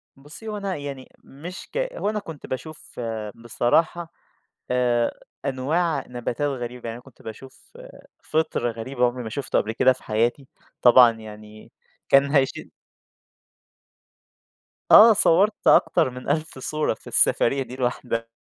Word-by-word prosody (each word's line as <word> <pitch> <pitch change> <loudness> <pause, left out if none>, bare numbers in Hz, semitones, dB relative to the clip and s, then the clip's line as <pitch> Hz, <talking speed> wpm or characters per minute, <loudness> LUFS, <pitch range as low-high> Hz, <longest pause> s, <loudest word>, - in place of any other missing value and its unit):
بُصّي، 145 +11 -13
هو 210 -1 -4
أنا 195 -2 -3
يعني 140 -2 -7
مش 170 +7 -10
ك - - -4
هو - - -2
أنا 215 0 -2
كنت 165 -7 -10
باشوف 150 +1 -8 0.4
بصراحة 155 +9 0 0.6
آآ 120 -2 +1 0.3
أنواع 150 +6 -1
نباتات 125 +3 -3
غريبة، 125 -2 -6
يعني 115 - -6
أنا 125 - -14
كنت 135 - -19
باشوف 130 - -12 0.5
فِطر 155 -6 -1
غريب 115 +4 -8
أنا 125 - +5
عُمري 125 0 -5
ما 110 - -6
شُفته 135 +4 -1
قبْل 110 - -2
كده 130 +3 +4
في 130 - -18
حياتي، 120 +5 -1 0.3
طبعًا 120 -1 +7
يعني 110 -1 -12 0.4
كان 140 +1 +5
هيشيل 135 -3 0 2.2
آه 225 +1 +10
صوّرت 205 +2 +2
أكتر - - +4
من 125 +1 -8
1000 155 -1 -2
صورة 150 +2 -1
في - - -18
السفرية 135 +3 +2
دي 125 +1 -10
لوحدها، 120 -2 -2
130 Hz, 140 wpm, -23 LUFS, 120-155 Hz, 2.2 s, آه